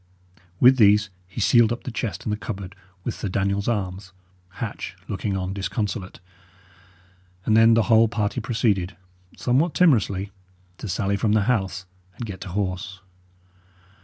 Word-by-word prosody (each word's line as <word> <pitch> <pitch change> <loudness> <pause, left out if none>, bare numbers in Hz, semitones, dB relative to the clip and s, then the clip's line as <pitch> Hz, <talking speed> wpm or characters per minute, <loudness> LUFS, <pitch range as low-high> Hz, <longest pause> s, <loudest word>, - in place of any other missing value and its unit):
With 130 +1 +7
these 105 -2 +5 0.2
he 95 - -8
sealed 115 +1 +5
up 120 - -4
the 125 - -5
chest 115 -3 -4
and 105 - -1
the - - -2
cupboard 100 -4 -6 0.3
with - - -2
Sir 105 - -4
Daniel's 100 +2 -1
arms, 95 -3 -3 0.4
Hatch - - -5
looking 100 -2 -2
on 95 0 -3
disconsolate; 100 0 -3 1.3
and 110 - +3
then 115 0 +6
the 115 - +4
whole 115 0 +5
party 110 +2 -2
proceeded, 105 -5 0 0.4
somewhat 140 +7 +1
timorously, 105 - +2 0.5
to - - -6
sally 100 +2 0
from 105 +1 +1
the 110 -2 +3
house 95 -6 -1 0.3
and 120 - -4
get 100 -4 -8
to 95 - -6
horse. 95 0 -3
105 Hz, 150 wpm, -24 LUFS, 95-115 Hz, 1.3 s, With